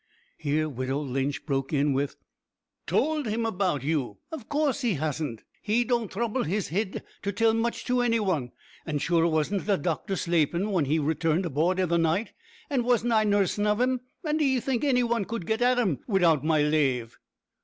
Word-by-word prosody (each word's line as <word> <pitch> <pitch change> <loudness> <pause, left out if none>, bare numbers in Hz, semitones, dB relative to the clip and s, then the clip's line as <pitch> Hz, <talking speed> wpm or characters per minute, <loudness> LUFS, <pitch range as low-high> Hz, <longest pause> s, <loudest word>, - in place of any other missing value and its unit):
Here 155 +1 0
widow 130 -1 -3
Lynch 135 0 -2
broke 135 -3 -1
in 145 -1 +2
with: 140 +1 -1 0.7
"Towld 310 -4 +1
him 225 +2 -1
about 185 - 0
you? 140 -8 -1 0.2
Av 270 -9 -7
course 290 -2 0
he 235 -7 +1
hasn't. 145 -5 -3 0.2
He 225 +3 +2
don't 235 -4 -1
throuble 235 +4 -1
his 200 +2 -1
hid 195 +3 -2 0.2
to 200 - -2
tell 225 +2 +2
much 230 +1 -1
to 250 0 +1
any 230 -1 +2
wan; 160 - -1 0.3
an', 155 -3 -2
sure, 165 +3 +2
wasn't 165 +5 0
the 200 -2 +3
doctor 170 +5 -2
slaapin' 170 0 +1
whin 175 -7 +2
he 150 +4 +1
returned 160 +3 0
aboord 170 +4 +1
i' 185 - +3
the 170 0 +1
night, 165 +7 0 0.3
an' 270 -6 0
wasn't 240 -1 +2
I 215 -1 +4
nursin' 205 0 +1
of 210 +1 +2
'im, 255 0 +1 0.2
and 310 -1 0
d'ee 270 -4 +2
think 245 0 -1
any 255 -4 +3
wan 235 -2 0
could 220 -2 -5
git 220 +5 -1
at 250 +1 +4
'im 195 - +1
widout 170 - +3
my 155 -1 +3
lave?" 135 -6 0
185 Hz, 190 wpm, -27 LUFS, 150-230 Hz, 0.7 s, I